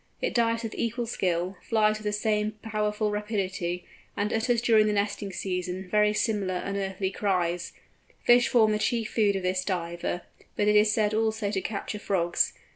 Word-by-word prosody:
It - - -1
dives 230 -1 +1
with 225 - -4
equal 235 +1 -2
skill, 180 -4 -1
flies 215 -1 +2
with 215 - -12
the 210 - +1
same 210 0 0
powerful 210 -1 -1
rapidity, 190 -4 -2 0.3
and 210 +2 0
utters 230 +1 +2
during 220 -2 +4
the 210 - +1
nesting 205 0 -1
season 180 0 -3
very 210 +2 +3
similar 205 -3 0
unearthly 195 0 -2
cries. 180 -4 -1 0.5
Fish 245 0 +6
form 220 -3 +4
the 210 - 0
chief 230 0 0
food 205 -3 +2
of 190 - -2
this 185 0 0
Diver, 175 -1 -3 0.3
but 205 - +1
it 210 - +4
is 210 0 +5
said 210 -1 +1
also 220 -1 0
to 195 -2 -1
capture 210 +1 -4
frogs. 175 -4 +1
210 Hz, 175 wpm, -27 LUFS, 190-220 Hz, 0.5 s, Fish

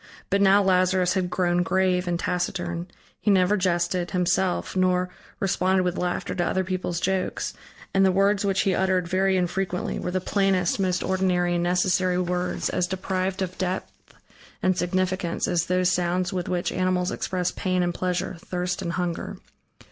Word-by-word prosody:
But 200 +1 +3
now 200 +1 +5
Lazarus 185 -1 +3
had 185 -2 0
grown 175 -1 +1
grave 185 0 +1
and 175 -1 0
taciturn, 175 -1 -2 0.3
he - - 0
never 190 0 +4
jested, 175 -1 0
himself, 180 +2 0
nor 185 -1 +2 0.3
responded 190 0 +1
with 180 0 -1
laughter 180 -1 -2
to 175 - 0
other 190 +2 0
people's 185 -2 -2
jokes; 190 +1 -1 0.4
and 195 - +4
the 190 - +5
words 195 +2 +2
which 195 -1 +1
he 195 - +1
uttered, 185 -2 +1
very 190 +1 +2
infrequently, 180 0 -1
were - - -3
the 185 +1 0
plainest, 190 -2 +1
most 185 -2 0
ordinary, 180 -2 +1
and 175 - 0
necessary 180 +1 +2
words, 180 0 -1
as 180 - 0
deprived 190 +1 -2
of 185 0 -6
depth 185 0 -2 0.7
and 185 0 +3
significance, 185 -1 -1
as 175 -1 0
those 180 0 +2
sounds 180 +1 0
with 180 -2 -3
which 180 -1 -1
animals 185 0 0
express 180 -1 -2
pain 185 -1 0
and 175 0 0
pleasure, 180 0 -2
thirst 180 0 -3
and 170 -2 -3
hunger. 175 -2 -3
185 Hz, 165 wpm, -25 LUFS, 180-190 Hz, 0.7 s, now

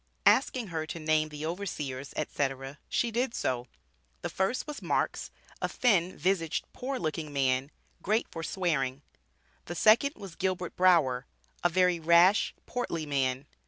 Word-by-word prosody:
Asking 255 -5 +3
her 160 -2 -3
to 165 - -5
name 155 0 +2
the 150 0 -6
overseers, 150 -7 -4
etc., 135 -1 -2
she 235 - +1
did 240 +2 -1
so. 125 -1 -1 0.6
The - - -3
first 190 +7 0
was 300 -2 -7
"Marks, - - -1 0.3
a - - 0
thin 185 -7 +2
visaged, 180 -4 0
poor 265 +1 -3
looking 155 -5 -3
man, 135 -1 +1 0.3
great 215 +4 +1
for 165 - -5
swearing." 150 -7 -1 0.6
The 175 - -5
second 225 - +5
was 195 -4 -9
"Gilbert 185 -2 -2
Brower, 150 -9 +3 0.4
a 175 - +5
very 180 0 +3
rash, 170 +5 +5
portly 170 -10 -3
man." 135 -2 0
165 Hz, 145 wpm, -29 LUFS, 145-195 Hz, 0.6 s, second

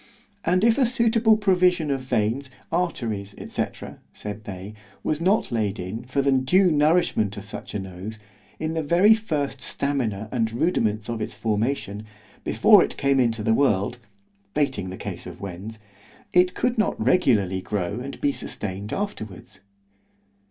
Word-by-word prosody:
And 180 +3 +2
if 230 +3 +4
a 265 - +5
suitable 230 -2 +4
provision 180 -6 +3
of 135 -1 -1
veins, 125 +2 -1 0.2
arteries, 115 - -2
&c. - - 0 0.5
said 105 +1 -7
they, 95 +2 -7 0.3
was 155 +1 -1
not 190 -3 +2
laid 110 -3 0
in, 105 +7 -5
for 135 +2 0
the 140 - +3
due 170 +8 +4
nourishment 150 - +2
of 100 - -7
such 105 - -8
a - - 0
nose, 95 +3 -7 0.4
in 160 0 -2
the 165 - 0
very 175 +8 +5
first 150 - -2
stamina 120 -8 -1
and 115 -3 0
rudiments 110 - 0
of 115 -2 -3
its - - -4
formation, 110 -1 -1 0.4
before - - +6
it - - -5
came 140 -1 +2
into 115 -3 +1
the 110 - +3
world 110 -3 +1 0.6
(bating 130 -11 0
the 95 - -7
case - - -6
of - - -9
Wens) 100 +3 -7 0.6
it 180 0 +4
could 245 -2 0
not 215 - +1
regularly 105 - +2
grow 100 +1 -2
and 135 +2 -7
be 145 - +3
sustained 100 -5 -5
afterwards. 110 - -5
125 Hz, 155 wpm, -24 LUFS, 105-170 Hz, 0.6 s, before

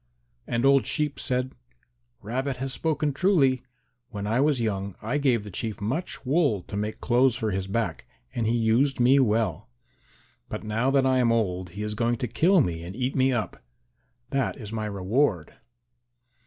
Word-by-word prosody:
And 120 +2 0
old 135 -1 +4
Sheep 150 -2 -1
said, 130 -1 -1 0.7
"Rabbit 130 +5 -2
has 135 +1 -3
spoken 155 -2 -1
truly. 135 -7 +3 0.5
When 100 -2 -5
I 115 +4 +1
was 145 -3 +2
young 100 -4 -2
I 125 +7 -1
gave 125 -6 +2
the 105 - -9
Chief 110 +3 -4
much 130 - -3
wool 135 - +2
to - - -8
make 105 +1 -3
clothes 125 0 +3
for 110 -4 -2
his 95 0 -2
back 115 +3 -2 0.3
and 115 -2 -1
he 115 - +2
used 120 +5 +2
me 130 +3 +5
well. 110 -6 0 0.8
But - - -5
now 110 +4 0
that 135 -1 +3
I 130 -1 +3
am 120 -2 +3
old 95 -6 0
he 105 - -3
is 105 0 -3
going 120 +2 0
to 125 - -2
kill 175 - +4
me 85 -9 -2
and 90 +3 -8
eat 130 +2 -2
me 130 0 +3
up. 115 - -3 0.7
That 135 -1 0
is 110 -4 -8
my 110 -1 -2
reward." 100 - 0
120 Hz, 180 wpm, -26 LUFS, 105-135 Hz, 0.8 s, me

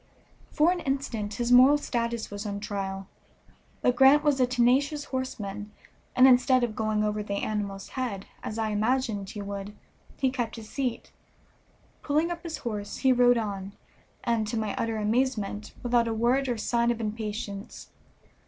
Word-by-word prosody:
For 315 +4 +3
an 360 - -1
instant 265 -8 -3
his 240 0 -1
moral 260 +4 +8
status 235 -5 -2
was 205 0 -5
on 200 0 -3
trial; 195 -2 -4 0.8
but 250 - +3
Grant 270 +4 +6
was 290 -3 +2
a 255 - +4
tenacious 260 +4 +2
horseman, 210 -6 -4 0.5
and 255 +1 +7
instead 255 0 +5
of 225 -3 -1
going 215 -1 0
over 210 0 -1
the 200 -1 -3
animal's 200 -2 -3
head, 235 -7 -4 0.2
as 215 - -5
I 220 -1 0
imagined 215 -2 0
he 210 -2 -6
would, 200 +1 -6 0.4
he 265 -2 +1
kept 240 -3 -3
his 220 -2 -10
seat. 260 -4 -3 0.9
Pulling 310 +4 +1
up 340 -1 -5
his 335 -2 -5
horse, 205 -3 -4
he 265 -1 +4
rode 245 0 +5
on, 200 -3 -4 0.5
and, 230 -3 0
to 225 - -2
my 215 -2 -1
utter 225 -1 -1
amazement, 215 -2 -1
without 240 -1 +2
a 225 - -1
word 250 +4 +2
or 240 - -1
sign 235 +2 +1
of 235 -1 0
impatience. 210 -1 -5
230 Hz, 165 wpm, -27 LUFS, 210-255 Hz, 0.9 s, moral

